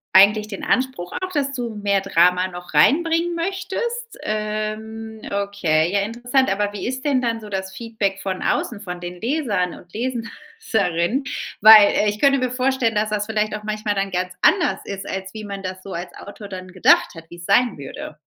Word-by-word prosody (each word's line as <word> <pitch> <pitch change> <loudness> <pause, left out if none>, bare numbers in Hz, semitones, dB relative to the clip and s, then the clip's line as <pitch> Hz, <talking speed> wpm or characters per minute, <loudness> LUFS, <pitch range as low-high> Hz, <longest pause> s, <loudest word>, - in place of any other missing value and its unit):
eigentlich 210 +2 +6
den 195 - -7
Anspruch 255 -9 -1
auch, 370 0 -3
dass 280 -4 -1
du 245 -3 -3
mehr 200 -1 +1
Drama 180 +2 +3
noch 175 0 -10
reinbringen 335 +3 +3
möchtest? 390 +7 -3
Ähm, 215 +1 -4
okay 195 -6 +1
ja 200 0 +2
interessant. 240 +3 0
Aber 205 +1 0
wie 205 - -5
ist 260 +1 -4
denn 275 -3 +2
dann 230 -2 -1
so 210 - -9
das 190 -1 -4
Feedback 220 -4 -2
von 190 -1 -3
außen, 225 -5 -1
von 180 -3 -6
den 175 0 -7
Lesern 230 - 0
und 175 - -14
Leserinnen? 235 - -2 0.4
Weil 215 -1 +8
ich 205 +1 -4
könnte 275 +2 +4
mir 255 -1 -1
vorstellen, 255 -2 +1
dass 215 0 0
das 210 -1 -1
vielleicht 215 -1 -1
auch 210 - -7
manchmal 215 -1 -2
dann 195 0 -1
ganz 180 0 -2
anders 190 - +3
ist, 195 -1 -6
als 190 0 -5
wie 215 -1 -7
man 200 -1 -6
das 185 0 -5
so 195 - -8
als 175 +2 -6
Autor 205 +1 -10
dann 185 -1 -7
gedacht 185 -1 +3
hat, 165 - -9
wie 175 - -11
es 175 - -10
sein 245 +5 +3
würde. 140 +2 -8
210 Hz, 190 wpm, -21 LUFS, 190-250 Hz, 0.4 s, Weil